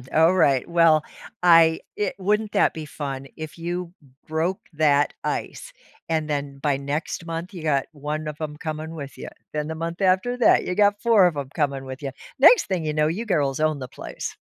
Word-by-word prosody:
Alright, 160 -5 +4
well, 165 -3 +4 0.4
I 165 -2 +6 0.2
it 205 -2 -1
wouldn't 210 +2 0
that 205 - +3
be 160 -1 -6
fun 135 -2 -6
if 155 0 -8
you 175 +1 -4
m 135 -3 -23
broke 160 +4 -1
that 150 -2 +2
ice, - - -4 0.3
and 160 -2 -1
then 140 -1 -3
by 140 -1 +1
next 145 +4 -4
month, 165 +3 -5
you 175 - -7
got 145 -4 +1
1 150 +1 -4
of 150 - -8
'em 155 -2 -4
coming 155 +1 -5
with 140 -3 -8
ya. - - -7 0.2
Then, 150 0 -3
the 160 - -4
month 165 +1 -4
after 190 +6 +2
that, 245 - +5
you 180 - -2
got 205 0 +3
4 225 -5 +5
of 170 - -2
'em 140 -2 -4
coming 140 -4 -1
with 130 +1 -8
ya. 140 -2 -4 0.3
Next 330 - +7
thing 180 -4 -2
you 155 - -1
know, 150 0 +2
you 190 +9 -2
girls 145 - 0
own 155 -1 +1
the 130 -1 -7
place. - - -7
160 Hz, 205 wpm, -24 LUFS, 145-180 Hz, 0.4 s, Next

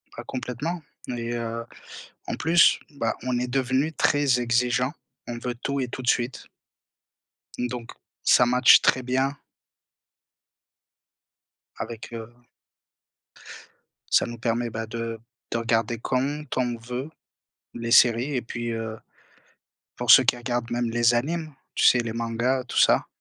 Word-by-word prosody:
Bah - - -7
complètement 130 +7 -4 0.3
et 120 0 -4
heu, 115 0 -4 0.6
en - - -2
plus, 165 +1 +5
bah, 115 -6 -2
on 125 -1 -1
est 125 - -2
devenu 130 +4 0
très 145 -4 +2
exigeants. 125 +2 +1 0.3
On 120 - -5
veut 120 +1 -4
tout 140 +3 -3
et 130 - -1
tout 125 - -7
de 125 - 0
suite. 120 +2 -1 1.1
Donc 125 -1 -4 0.3
ça - - +5
matche 125 +1 +6
très 130 - +3
bien 130 +3 -1 2.4
avec 115 0 -7
heu 115 -1 -6 1.8
ça - - +4
nous 120 0 -7
permet, 120 +1 -1
bah, 115 0 -4
de 115 0 -5 0.3
de - - 0
regarder 115 0 0
quand 135 +5 -1
on 120 -2 0
veut 125 +5 -6 0.6
les 115 0 -5
séries 120 +5 +5
et 125 - 0
puis, 120 0 -5
heu, 110 -1 -4 1.0
pour 120 -2 +3
ceux 130 - +9
qui 120 0 +2
regardent 120 -1 -3
même 120 0 -1
les 120 0 +3
animes, 155 +4 -2 0.2
tu - - +1
sais 125 - +5
les 115 -1 -4
mangas, 115 +3 -1
tout - - -6
ça, - - +4
120 Hz, 140 wpm, -25 LUFS, 115-130 Hz, 2.4 s, ceux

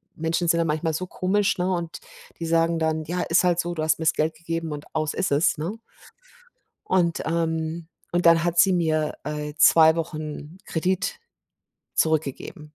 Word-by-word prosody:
Menschen 165 +2 -1
sind 170 0 +3
da - - +3
manchmal 155 +1 -1
so 185 +4 -3
komisch, 195 +2 0
ne, 180 +1 0
und 170 -1 -4 0.4
die 165 - -3
sagen 165 0 +2
dann: 160 0 0
„Ja, 175 +2 -2
ist 170 +2 +3
halt 175 -1 +2
so, 175 0 -1
du 155 -2 -3
hast 155 +1 +1
mir's 160 -1 +2
Geld 155 +1 -1
gegeben.“ 165 0 -4
und 145 0 -6
aus 155 -1 -1
ist 185 - -1
es, 150 +3 +2
ne? 165 +7 -3 1.1
Und, 175 -3 +1
ähm 160 0 -2 0.2
und 175 0 0
dann 165 0 +6
hat 175 0 -1
sie 190 +2 +5
mir, 155 -3 0
äh, 150 0 -4
2 160 0 +6
Wochen 155 0 -5
Kredit 185 - -1 0.8
zurückgegeben. 155 +2 -1
165 Hz, 175 wpm, -24 LUFS, 155-175 Hz, 1.1 s, dann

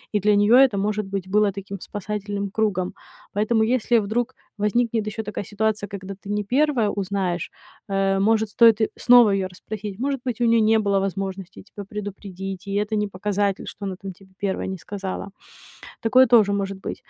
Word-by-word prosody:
и - - +4
для 210 +2 +3
неё 205 +2 +4
это, 255 -4 +6
может 210 +1 -1
быть, 195 -1 -5
было 210 0 +3
таким 200 0 -7
спасательным 205 0 -4
кругом. 195 -4 0 0.4
Поэтому 220 +3 +2
если 235 -1 +2
вдруг 220 +4 0 0.3
возникнет 220 +1 0
ещё 220 +1 -4
такая 210 -1 -5
ситуация, 215 0 -1
когда 195 -1 -7
ты 200 - -8
не 210 0 -1
1 255 -1 +2
узнаешь, 190 -3 -2 0.4
э, 195 0 +1
может, 220 +1 +2
стоит 230 -2 +6
и - - +2
снова 245 -4 +6
её 195 -1 0
расспросить. 205 +2 -7
Может 275 0 -1
быть, 245 -1 -2
у - - +4
неё 230 -1 +4
не 220 - +4
было 200 -2 +1
возможности 195 -1 -4
тебя 205 0 -10
предупредить, 195 -2 -6
и - - -4
это 210 +2 0
не 210 0 0
показатель, 200 0 -1
что 200 - -7
она 190 -1 -3
там 195 +1 -8
тебе 190 +1 -20
1 195 -1 -2
не 190 - -4
сказала. 200 +1 -6 0.7
Такое 255 +3 +5
тоже 225 -5 +5
может 195 -1 -2
быть. - - -4
205 Hz, 185 wpm, -23 LUFS, 195-220 Hz, 0.7 s, это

